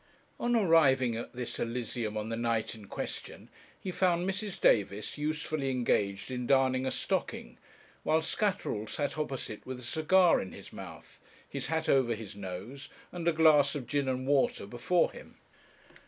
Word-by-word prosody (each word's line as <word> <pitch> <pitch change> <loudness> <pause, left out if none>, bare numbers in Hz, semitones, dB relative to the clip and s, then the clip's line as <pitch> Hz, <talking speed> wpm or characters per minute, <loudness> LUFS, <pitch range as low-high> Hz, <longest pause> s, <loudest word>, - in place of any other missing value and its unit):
On 240 0 +1
arriving 140 - +4
at 115 - -6
this 125 -1 -5
elysium, 115 -2 -3
on 105 +1 -3
the 115 - -2
night 115 -1 0
in 110 -3 -11
question, - - -6 0.3
he 185 - -4
found 180 -1 +2
Mrs. 200 0 -3
Davis 100 0 +2
usefully 150 -1 -2
engaged 105 -4 0
in 125 -1 -3
darning 130 -1 +3
a - - +2
stocking, - - -3 0.4
while 160 +1 +2
Scatterall 160 - -1
sat 145 +5 -3
opposite 135 -7 -4
with 130 0 -6
a 125 - -10
cigar 170 +6 +4
in 95 - -7
his - - -11
mouth, - - -10 0.3
his - - -4
hat 160 0 -1
over 125 -4 +3
his 105 -3 -9
nose, 100 +8 -7 0.2
and 170 -1 -4
a - - +6
glass 155 -3 +5
of 135 -4 -4
gin 145 0 0
and 130 0 -1
water 135 -7 +2
before 125 - +1
him. - - -13
130 Hz, 165 wpm, -31 LUFS, 115-160 Hz, 0.4 s, a